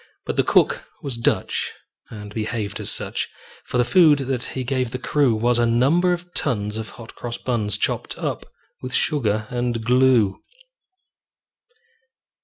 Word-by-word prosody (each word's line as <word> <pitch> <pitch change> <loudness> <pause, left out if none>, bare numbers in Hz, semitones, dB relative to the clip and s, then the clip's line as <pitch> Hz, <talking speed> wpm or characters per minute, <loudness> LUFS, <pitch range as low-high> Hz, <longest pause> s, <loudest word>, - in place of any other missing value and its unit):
But - - -3
the - - +4
cook - - +3 0.2
was 135 -4 -2
Dutch, 115 - 0 0.4
and 105 -2 -9
behaved 110 -2 -3
as - - -2
such; - - -2 0.4
For - - -2
the 125 - +3
food 155 +2 +6
that 135 -2 -2
he 130 +1 -3
gave 130 -1 -1
the 125 - -4
crew 135 -2 +2
Was 120 +2 +2
a 120 - +3
number 140 +10 +3
of 175 0 -4
tons 105 -6 -1
of 110 -2 -5
hot 115 -1 -11
cross 120 -1 -5
buns, 105 -5 0
Chopped - - -1
up - - -3 0.3
with 130 0 -4
sugar 110 -7 +1
and 120 -2 -2
glue. 125 -5 +4
120 Hz, 155 wpm, -22 LUFS, 110-130 Hz, 0.4 s, food